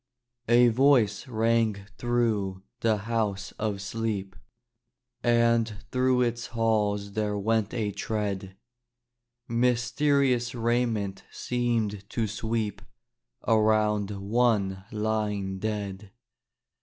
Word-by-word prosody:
A 120 +1 +6
voice 120 -3 +3
rang 110 -3 +1
through 110 -6 0 0.2
the 110 -2 +2
House 105 -4 -1
of 105 -2 -2
Sleep, 100 -2 -3 0.9
And 115 -2 +3 0.2
through 130 0 +3
its 120 0 -2
halls 105 -3 0
there 105 0 -1
went 110 +1 0
a 105 -4 -1
tread; 100 -3 -3 0.9
Mysterious 125 +1 +1
raiment 115 -4 0
seemed 115 -5 -2
to 115 - -1
sweep 110 -1 -2 0.7
Around 110 -2 +3
one 100 -2 0
lying 105 -3 -1
dead. 100 -2 -4
110 Hz, 90 wpm, -27 LUFS, 100-120 Hz, 0.9 s, A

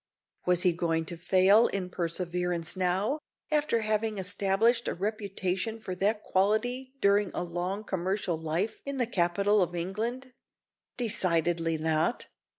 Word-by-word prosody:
Was 180 0 +3
he 180 - +5
going 165 -1 0
to 170 - -5
fail 190 +6 +5
in 185 -2 -3
perseverance 175 0 -2
now, 190 +10 +1 0.3
after 300 -6 +2
having 215 0 0
established 200 +5 +1
a - - -1
reputation 200 +1 -2
for 190 -4 -5
that 205 +4 0
quality 245 +7 0
during 200 0 +3
a - - -1
long 180 +4 -3
commercial 190 -1 -1
life 160 +6 -2
in 280 -1 -4
the 250 - +2
capital 200 +1 +2
of 175 -1 0
England? 230 +9 -3 0.6
Decidedly 170 -7 +1
not. 160 +8 0
190 Hz, 135 wpm, -29 LUFS, 175-215 Hz, 0.6 s, he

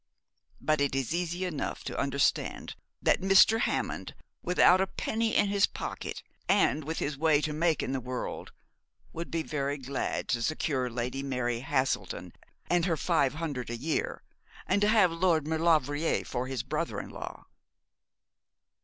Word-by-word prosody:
But 155 -1 +1
it 140 -1 +1
is 135 +2 -1
easy 175 +1 -1
enough 155 -6 -3
to - - -5
understand 140 0 0 0.3
that - - +3
Mr. 195 +4 +6
Hammond - - -2 0.3
without 180 +1 +5
a 190 - +1
penny 220 +3 -1
in 200 - +4
his 200 0 +3
pocket, - - -6 0.3
and 150 +5 +3
with 160 +2 -3
his 140 -2 -2
way 155 -2 +4
to 150 0 -2
make 160 0 +1
in - - -2
the 135 - -1
world, 125 0 -5 0.6
would 170 +1 -5
be 165 -1 -1
very 145 -2 -2
glad 135 0 -3
to 115 - +1
secure 130 -1 0
Lady 125 +3 -3
Mary 125 -3 -1
Haselden 130 +1 -1 0.3
and 175 -1 +2
her 165 -4 +1
five 150 -5 +1
hundred 145 -7 -4
a 120 - -3
year, 155 +6 -2 0.4
and 200 +2 +1
to 205 - +4
have 210 -5 +5
Lord 165 -3 +2
Maulevrier 160 -1 +1
for 125 +1 -3
his 130 -3 -3
brother - - -2
in - - -8
law?' - - -8
155 Hz, 160 wpm, -29 LUFS, 135-175 Hz, 0.6 s, Mr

